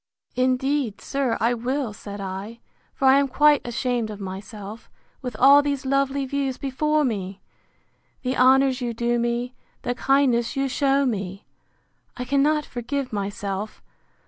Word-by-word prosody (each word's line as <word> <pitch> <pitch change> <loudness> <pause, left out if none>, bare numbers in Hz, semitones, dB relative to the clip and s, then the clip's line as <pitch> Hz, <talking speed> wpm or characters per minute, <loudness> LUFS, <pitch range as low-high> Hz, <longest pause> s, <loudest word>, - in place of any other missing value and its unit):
Indeed, 255 -2 0
sir, 275 -4 -1
I 230 +2 +2
will, 245 0 -2
said 205 -1 -8
I; 195 +4 -6 0.4
for 270 - +2
I 265 +1 +7
am 280 - +2
quite 295 +3 +4
ashamed 240 -2 -1
of 210 -1 -7
myself, 200 +2 -8 0.3
with 250 -4 -5
all 280 +3 +7
these 285 -1 -2
lovely 275 0 +1
views 270 -1 -2
before 300 +3 0
me!—The 205 +4 -7
honours 265 +1 +4
you 240 -2 -2
do 240 +1 0
me, 240 +1 -1 0.3
the 245 - -1
kindness 255 -2 +2
you 275 0 0
shew 275 +1 +2
me!—I 200 +3 -7
cannot 285 +3 +2
forgive 255 +1 -4
myself! 200 0 -4
250 Hz, 135 wpm, -24 LUFS, 225-275 Hz, 0.4 s, I